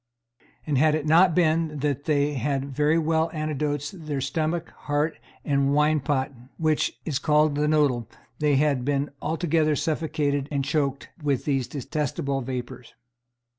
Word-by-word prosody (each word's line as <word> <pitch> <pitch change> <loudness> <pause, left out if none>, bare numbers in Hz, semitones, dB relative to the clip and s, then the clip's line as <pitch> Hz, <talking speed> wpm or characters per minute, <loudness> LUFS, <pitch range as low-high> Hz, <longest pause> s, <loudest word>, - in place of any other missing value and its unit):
And 145 -4 +1
had 155 +1 +4
it 155 -1 -2
not 165 +2 +5
been 160 -2 +2
that 145 -1 -1
they 145 -1 +2
had 135 +1 -1
very 150 +3 +1
well 160 0 +1
antidoted 150 +2 -3
their 145 -2 -1
stomach, 160 +5 -2 0.2
heart, 150 +2 0 0.3
and 140 -1 +2
wine 150 +1 +3
pot, 140 -1 -1 0.3
which 155 -2 0
is 145 -4 -1
called 150 0 +3
the 150 +1 +1
noddle, 140 -7 +2 0.3
they 150 -2 +3
had 140 -2 +2
been 140 +1 0
altogether 160 -1 +1
suffocated 145 -3 -1
and 140 -2 -1
choked 140 -1 -1
with 140 -3 0
these 135 -4 0
detestable 140 0 -2
vapours. 125 -1 -6
150 Hz, 145 wpm, -25 LUFS, 140-155 Hz, 0.3 s, not